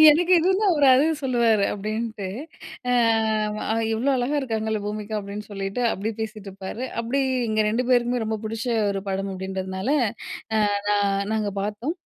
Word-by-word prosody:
எனக்கு 345 +4 +3
எதுனா 380 +5 +2
ஒரு 285 - +5
அது 265 +3 +4 0.2
சொல்லுவாரு 235 -5 +3
அப்பிடின்ட்டு, 215 0 -3 0.6
அ - - +3 1.0
"இவ்ளோ 235 +5 +1
அழகா 255 +4 0
இருக்காங்கல்ல 220 -4 -2
பூமிகா!" 210 +1 -4
அப்பிடின்னு 205 +1 -7
சொல்லிட்டு, 195 +4 -3
அப்டி 215 +3 -3
பேசிட்டு 215 -2 -5
இருப்பாரு. 195 +5 -6 0.2
அப்பிடி 240 +4 0 0.3
எங்க 215 0 +1
2 240 +4 0
பேருக்குமே 245 -1 +2
ரொம்ப 220 0 -1
பிடிச்ச 225 +2 -4 0.2
ஒரு 195 -1 -3
படம் 195 +1 -2
அப்பிடின்றதுனால, 190 +2 -4 0.7
அ - - +3 0.3
நான் 200 -1 +1
நாங்க 215 -2 0
பார்த்தோம். 220 - -3
220 Hz, 145 wpm, -24 LUFS, 200-245 Hz, 1.0 s, ஒரு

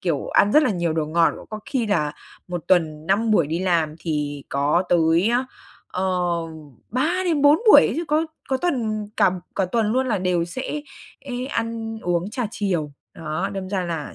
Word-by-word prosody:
kiểu, 165 -6 -1
ăn 205 - +3
rất 305 - +6
là 275 - +2
nhiều 175 -4 -1
đồ 155 -1 -1
ngọt, 165 +2 +3
cũng - - -12
có 215 0 -6
khi 255 -5 0
là 155 -8 0 0.4
1 175 -2 -4
tuần 160 -4 +1
5 215 +5 +2
buổi 170 -8 +4
đi 160 +3 -2
làm 170 -4 +1
thì 150 -3 -3
có 145 +5 +1
tới 170 +3 +3
á, 245 +2 +1 0.4
ờ, 185 - -3 0.9
3-4 310 - +3
buổi - - +10
ấy - - +1
chứ, 335 - -2
có 310 +2 +2 0.2
có 265 - +1
tuần 230 -9 -1
cả - - +4 0.2
cả 195 - +1
tuần 230 -2 +2
luôn 260 +2 +1
là 225 -5 0
đều 180 -2 +1
sẽ 260 - -4 0.4
ế 250 -2 -5
ăn 230 -3 -3
uống 175 +2 -1
trà 245 +1 -2
chiều. 175 -9 -2 0.2
Đó, 165 +4 -3
đâm 195 -1 -5
ra 190 -2 -1
là 165 -4 -4
190 Hz, 190 wpm, -23 LUFS, 165-240 Hz, 0.9 s, buổi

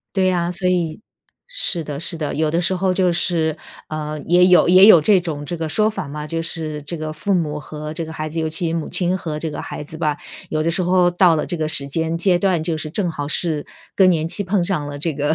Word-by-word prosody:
对 185 -1 +3
啊， 175 -1 0
所 180 +1 -1
以 170 -3 -1 0.5
是 485 - -2
的 145 -1 -5
是 170 - -2
的。 155 -2 -3
有 155 0 0
的 165 +2 +1
时 180 +2 +1
候 185 0 +1
就 180 -2 +2
是， 160 -3 0 0.3
呃， 155 0 -4
也 180 +1 +5
有 180 -2 +5
也 185 +3 +8
有 180 -7 +9
这 195 +4 +4
种 155 -4 -5
这 175 +4 -4
个 160 -1 -3
说 215 +7 +2
法 210 - -5
嘛， 150 +1 -6
就 165 +2 -3
是 155 -2 -3
这 160 +4 -6
个 155 -1 -5
父 200 +6 -1
母 150 -4 -1
和 150 +1 -7
这 165 +1 -4
个 160 - -8
孩 155 0 -4
子 165 +2 -3
尤 160 - -1
其 160 +1 -1
母 165 -2 -3
亲 180 0 0
和 160 -4 -5
这 160 +1 -4
个 - - -6
孩 - - -6
子 155 - -9
吧， 150 -3 0 0.3
有 155 0 -1
的 165 - +1
时 175 +3 -1
候 180 0 +3
到 175 -2 +4
了 150 - -1
这 175 - -3
个 155 -1 -2
时 140 -3 0
间 165 +3 -1
阶 175 +1 +2
段， 180 -3 +1
就 165 -1 -1
是 155 0 -5
正 180 +1 -1
好 145 -3 -5
是 155 -2 -1 0.3
更 190 -2 +5
年 160 -3 +1
期 185 +5 -1
碰 190 -1 0
上 170 -6 -1
了 145 0 -6
这 160 +2 -2
个 145 +2 0
165 Hz, 280 characters per minute, -20 LUFS, 155-180 Hz, 0.5 s, 有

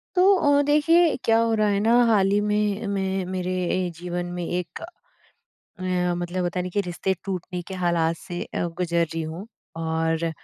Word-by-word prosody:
तो 380 +2 +6
अ, 285 -4 +3
देखिए 305 +3 +4
क्या 225 0 +4
हो 230 0 +2
रहा 215 -1 +2
है 200 -1 +1
न 210 - 0 0.2
हाल 200 -4 +3
ही 205 +1 +3
में 210 +1 0
मैं 190 -1 -1
मेरे 185 0 -2 0.4
जीवन 175 0 -4
में 175 - -3
एक 175 0 -4 0.8
अ, 180 -1 -2
मतलब 175 +1 -3
होता 175 +1 -1
नहीं 180 0 -4
कि 205 - 0
रिश्ते 185 +2 -1
टूटने 180 -2 -4
के 190 - -5
हालात 170 -2 +1
से 175 +2 -6
गुजर 170 0 0
रही 165 - -2
हूँ। 160 +6 -6 0.3
और 165 0 -1
185 Hz, 175 wpm, -24 LUFS, 175-210 Hz, 0.8 s, तो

